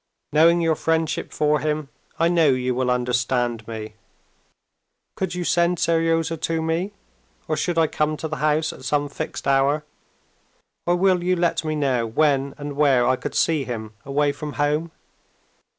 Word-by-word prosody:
Knowing 165 Hz, +3 st, +5 dB
your 165 Hz, -1 st, +2 dB
friendship 160 Hz, 0 st, -1 dB
for 150 Hz, 0 st, +1 dB
him, 150 Hz, 0 st, -2 dB, 0.3 s
I 165 Hz, -, +3 dB
know 170 Hz, -2 st, +3 dB
you 130 Hz, -1 st, +1 dB
will 125 Hz, 0 st, 0 dB
understand 120 Hz, -2 st, 0 dB
me. 110 Hz, -1 st, -6 dB, 1.2 s
Could 185 Hz, -2 st, -3 dB
you 180 Hz, -, -2 dB
send 175 Hz, 0 st, +2 dB
Seryozha 165 Hz, 0 st, +1 dB
to 165 Hz, 0 st, -1 dB
me, 170 Hz, +5 st, -1 dB, 0.5 s
or 155 Hz, -, 0 dB
should 175 Hz, +2 st, -1 dB
I 165 Hz, -, +5 dB
come 155 Hz, 0 st, -1 dB
to 160 Hz, -, -4 dB
the 155 Hz, 0 st, -4 dB
house 155 Hz, +1 st, +1 dB
at -, -, -13 dB
some 145 Hz, +2 st, 0 dB
fixed -, -, -5 dB
hour, 140 Hz, +2 st, +2 dB, 1.0 s
or 175 Hz, -, +4 dB
will 185 Hz, -1 st, +2 dB
you 185 Hz, +1 st, +2 dB
let 170 Hz, -1 st, 0 dB
me 155 Hz, -1 st, -2 dB
know 130 Hz, -6 st, 0 dB
when 140 Hz, +2 st, +1 dB
and 145 Hz, -1 st, -5 dB
where 140 Hz, -4 st, +4 dB
I 130 Hz, +1 st, +3 dB
could -, -, -6 dB
see 155 Hz, -4 st, +2 dB
him 110 Hz, -4 st, -6 dB
away 145 Hz, +1 st, +1 dB
from 150 Hz, +1 st, -7 dB
home? 150 Hz, +3 st, 0 dB
150 Hz, 165 wpm, -23 LUFS, 135-165 Hz, 1.2 s, Knowing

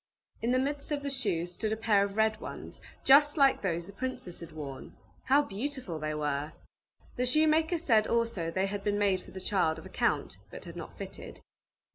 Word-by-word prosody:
In 235 Hz, -, +1 dB
the 255 Hz, -, +3 dB
midst 280 Hz, +3 st, -1 dB
of 290 Hz, -1 st, -1 dB
the 280 Hz, -, -2 dB
shoes 190 Hz, -10 st, -1 dB
stood 215 Hz, +4 st, -2 dB
a 220 Hz, -, 0 dB
pair 215 Hz, -3 st, +3 dB
of 200 Hz, +1 st, -4 dB
red 220 Hz, 0 st, +2 dB
ones, -, -, -8 dB, 0.2 s
just 290 Hz, +3 st, +6 dB
like 275 Hz, -2 st, +5 dB
those 170 Hz, -3 st, -1 dB
the 200 Hz, -, -11 dB
princess 255 Hz, -6 st, -5 dB
had 170 Hz, -1 st, -9 dB
worn. 145 Hz, -4 st, -8 dB, 0.3 s
How 280 Hz, +2 st, +5 dB
beautiful 245 Hz, -, -4 dB
they 155 Hz, 0 st, -2 dB
were! 150 Hz, 0 st, -2 dB, 0.6 s
The 250 Hz, -, +1 dB
shoemaker 315 Hz, +5 st, +3 dB
said 230 Hz, -10 st, +3 dB
also 230 Hz, -8 st, 0 dB
they 190 Hz, +3 st, 0 dB
had 200 Hz, 0 st, -4 dB
been 205 Hz, 0 st, +1 dB
made 200 Hz, -2 st, +2 dB
for -, -, -14 dB
the 190 Hz, -, -8 dB
child 185 Hz, -4 st, +1 dB
of 160 Hz, -, -10 dB
a -, -, -9 dB
count, -, -, 0 dB
but -, -, -9 dB
had -, -, -9 dB
not -, -, -8 dB
fitted. -, -, -8 dB
210 Hz, 205 wpm, -30 LUFS, 175-265 Hz, 0.6 s, just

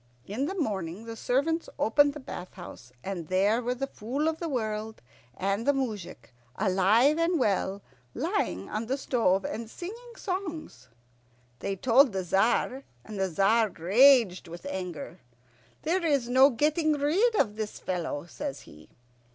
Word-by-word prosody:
In 245 Hz, +8 st, -2 dB
the 385 Hz, -, -4 dB
morning 200 Hz, -, -3 dB
the 230 Hz, 0 st, -6 dB
servants 285 Hz, +8 st, 0 dB
opened 285 Hz, +6 st, +4 dB
the -, -, -6 dB
bath 185 Hz, -8 st, -8 dB
house, 175 Hz, -8 st, -11 dB
and 180 Hz, -5 st, -5 dB
there 200 Hz, +6 st, +2 dB
were 245 Hz, +1 st, -1 dB
the 275 Hz, +2 st, -2 dB
Fool 275 Hz, +5 st, -3 dB
of 320 Hz, 0 st, -1 dB
the 335 Hz, -, -3 dB
World 220 Hz, -4 st, -3 dB, 0.4 s
and 195 Hz, +5 st, -1 dB
the 285 Hz, -, +5 dB
moujik, 205 Hz, -, -5 dB, 0.2 s
alive 215 Hz, -, +3 dB
and 335 Hz, +1 st, +2 dB
well, 200 Hz, -3 st, 0 dB, 0.3 s
lying 95 Hz, +2 st, -1 dB
on 215 Hz, +2 st, -4 dB
the 265 Hz, +3 st, 0 dB
stove 210 Hz, -8 st, +1 dB
and 225 Hz, 0 st, -5 dB
singing 465 Hz, -, -9 dB
songs. 330 Hz, -, -5 dB, 0.7 s
They 195 Hz, -, -2 dB
told 250 Hz, +4 st, +4 dB
the 190 Hz, -1 st, -1 dB
Tzar, 225 Hz, +8 st, +1 dB, 0.2 s
and 210 Hz, -2 st, -7 dB
the 190 Hz, -1 st, +1 dB
Tzar 210 Hz, +6 st, +3 dB
raged 200 Hz, +2 st, +4 dB
with 170 Hz, +2 st, -10 dB
anger. 180 Hz, -3 st, -5 dB, 0.6 s
"There 345 Hz, +4 st, 0 dB
is 285 Hz, -7 st, +1 dB
no 260 Hz, +3 st, +6 dB
getting 305 Hz, +5 st, +1 dB
rid 340 Hz, +12 st, +2 dB
of 210 Hz, -6 st, +1 dB
this 215 Hz, -1 st, -4 dB
fellow," 170 Hz, -5 st, -3 dB
says 280 Hz, +10 st, -6 dB
he. 75 Hz, +1 st, -16 dB
225 Hz, 155 wpm, -28 LUFS, 190-285 Hz, 0.7 s, no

